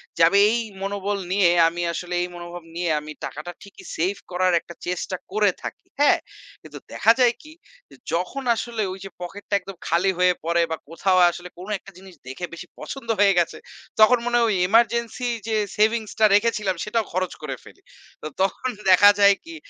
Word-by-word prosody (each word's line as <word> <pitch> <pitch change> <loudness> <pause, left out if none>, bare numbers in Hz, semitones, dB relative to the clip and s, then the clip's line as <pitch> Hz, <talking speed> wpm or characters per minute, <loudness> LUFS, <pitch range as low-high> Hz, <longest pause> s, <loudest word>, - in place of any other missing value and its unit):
যে - - -2
আমি 200 - +4
এই 235 +1 +1 0.2
মনোবল 200 +1 -2
নিয়ে, 190 -3 +4 0.2
আমি 170 +1 -3
আসলে 180 +1 -5
এই - - -3
মনোভাব 175 0 -8
নিয়ে 175 0 -1
আমি 155 +1 -9
টাকাটা 150 +4 -7
ঠিকই 200 - -14
সেভ 185 +5 0 0.2
করার 185 0 +1
একটা 170 - -12
চেষ্টা 180 +1 -3 0.2
করে 210 -1 +3
থাকি। - - -8
হ্যাঁ? 290 - +5 0.4
কিন্তু - - -11 0.2
দেখা 225 - +4
যায় 245 -1 +5
কি 310 - -13 0.4
যে - - -16 0.2
যখন 185 +11 -2
আসলে 230 -1 -4
ওই 190 - -8
যে - - -7
পকেটটা 200 +3 -7
একদম 195 +1 -10
খালি 180 +4 +2
হয়ে 180 0 +4
পড়ে 170 0 +2
বা 160 - -1
কোথাও 185 +3 +1
আসলে 175 +1 -9
কোন 185 - -9
একটা 195 - -15
জিনিস 190 -1 -14
দেখে 135 +7 -5
বেশি 170 +1 -9
পছন্দ 270 -4 -8
হয়ে 200 -1 +5
গেছে, 170 - -1 0.4
তখন 230 +4 +7
মনে 240 0 0
হয়, 235 - +3
ওই 200 - +1
এমার্জেন্সি 235 +2 +2 0.2
যে 220 - 0 0.2
সেভিংস 220 0 +2
টা 220 - +6
রেখেছিলাম, 210 -3 +1
সেটাও 220 0 -1
খরচ 185 0 -1
করে 140 -4 -4
ফেলি। - - -17 0.4
তো - - -5
তখন 195 +7 0 0.2
দেখা 190 +2 +8
যায় 200 0 +6
কি 335 0 -9
195 Hz, 190 wpm, -23 LUFS, 175-220 Hz, 0.4 s, দেখা